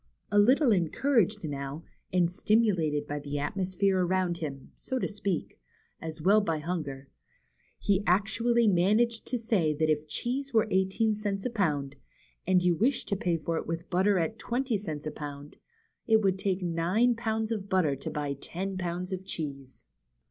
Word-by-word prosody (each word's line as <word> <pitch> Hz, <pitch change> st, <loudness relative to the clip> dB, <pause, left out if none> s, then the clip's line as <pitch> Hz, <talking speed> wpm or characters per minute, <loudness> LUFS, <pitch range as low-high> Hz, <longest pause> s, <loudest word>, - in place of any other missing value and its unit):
A 205 Hz, -, +5 dB
little 255 Hz, +5 st, +5 dB
encouraged 210 Hz, -, +2 dB
now, 140 Hz, +1 st, -5 dB, 0.3 s
and 175 Hz, -2 st, +2 dB
stimulated 180 Hz, -8 st, +2 dB
by 145 Hz, 0 st, -4 dB
the 145 Hz, 0 st, -6 dB
atmos 185 Hz, +6 st, -2 dB
phere 195 Hz, -2 st, +3 dB
around 180 Hz, -1 st, 0 dB
him, 140 Hz, -4 st, -6 dB
so 260 Hz, -, -4 dB
to -, -, 0 dB
speak, 200 Hz, -, -3 dB, 0.4 s
as 160 Hz, -1 st, -6 dB
well 205 Hz, +4 st, +6 dB
as -, -, -1 dB
by 165 Hz, -3 st, 0 dB
hunger, 150 Hz, -5 st, -4 dB, 0.7 s
he 200 Hz, 0 st, +1 dB
actually 225 Hz, +5 st, +3 dB
managed 215 Hz, +5 st, +2 dB
to 250 Hz, -, -1 dB
say 200 Hz, -10 st, +1 dB
that 155 Hz, +1 st, +2 dB
if 155 Hz, 0 st, -1 dB
cheese 265 Hz, -, -3 dB
were 220 Hz, -, +4 dB
eighteen 190 Hz, +4 st, +2 dB
cents 205 Hz, -2 st, -3 dB
a 250 Hz, -, -1 dB
pound, 145 Hz, -10 st, -1 dB, 0.5 s
and 185 Hz, -1 st, +4 dB
you 180 Hz, -1 st, +4 dB
wished 245 Hz, -, 0 dB
to 200 Hz, -, +1 dB
pay 175 Hz, -3 st, 0 dB
for 165 Hz, +1 st, -2 dB
it -, -, -4 dB
with 165 Hz, +1 st, -3 dB
hotter 190 Hz, +2 st, +3 dB
at 180 Hz, +6 st, -1 dB
twenty 250 Hz, 0 st, -1 dB
cents 160 Hz, -8 st, -4 dB
a 155 Hz, -, -2 dB
pound, 145 Hz, -1 st, -8 dB, 0.5 s
it 220 Hz, -1 st, +4 dB
would 190 Hz, -1 st, +2 dB
take 190 Hz, -1 st, -1 dB
nine 180 Hz, +8 st, +2 dB
pounds 220 Hz, -1 st, -2 dB
of 200 Hz, -3 st, -3 dB
butter 180 Hz, -7 st, +2 dB
to 135 Hz, -, -6 dB
buy 145 Hz, -1 st, -2 dB
ten 185 Hz, +7 st, -5 dB
pounds 180 Hz, +1 st, -3 dB
of 185 Hz, 0 st, -4 dB
cheese. 140 Hz, -7 st, -7 dB
185 Hz, 175 wpm, -29 LUFS, 155-215 Hz, 0.7 s, well